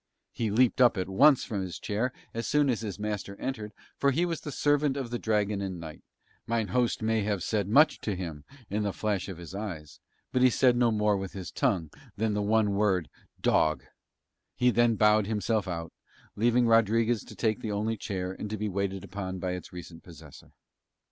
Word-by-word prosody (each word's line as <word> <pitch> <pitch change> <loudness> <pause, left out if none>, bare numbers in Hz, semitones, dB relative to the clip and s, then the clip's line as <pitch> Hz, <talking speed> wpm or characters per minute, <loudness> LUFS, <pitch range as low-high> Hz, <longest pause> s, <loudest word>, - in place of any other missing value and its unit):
He 115 -2 -2
leaped 120 +4 +3
up 120 -3 +5
at 90 - -1
once 135 +9 +5
from 105 -5 -3
his 90 -4 -5
chair 110 +5 -1 0.2
as 115 0 -3
soon 145 -2 +3
as 115 - -2
his 105 -4 -5
master 105 -2 -4
entered, 110 -5 -4 0.3
for 140 - +3
he 160 +6 +1
was 165 -2 -3
the 150 - -6
servant 145 0 +1
at 130 -4 -4
the 120 - -2
Dragon 105 -2 0
and 95 -3 -4
Knight; 80 -2 -9 0.5
mine 115 -3 0
host 120 +2 0
may 110 0 +1
have 100 -3 -1
said 105 -3 0
much 150 +9 +5
to 105 - -3
him 80 -5 -6 0.2
with 105 +2 -1
a 100 - -2
flash 105 -3 -2
of 95 - -6
his 85 0 -10
eyes, 90 -8 -6 0.3
but 125 - +1
he 130 - +7
said 125 0 +3
no 120 -1 +3
more 105 -1 +2
with 95 -1 -5
his 95 -3 -7
tongue 80 -5 0 0.3
than 110 0 0
the 105 - 0
one 105 0 +2
word, 100 -5 +1 0.3
"Dog": 80 0 +2 0.7
he 125 0 +3
then 120 -1 +3
bowed 105 -1 +4
himself 110 -1 0
out, 85 -2 -5 0.4
leaving 120 +3 +3
Rodriguez 115 0 +3
to - - -11
take 110 -1 0
the 110 -4 -4
only 105 +2 -1
chair 95 -4 -4
and 105 +2 -6
to 110 - -3
be 105 +1 -2
waited 95 -1 -2
upon 95 -1 -5
by 90 0 -3
its 90 -1 -6
recent 85 -2 -10
possessor. 80 -4 -14
105 Hz, 205 wpm, -28 LUFS, 95-115 Hz, 0.7 s, he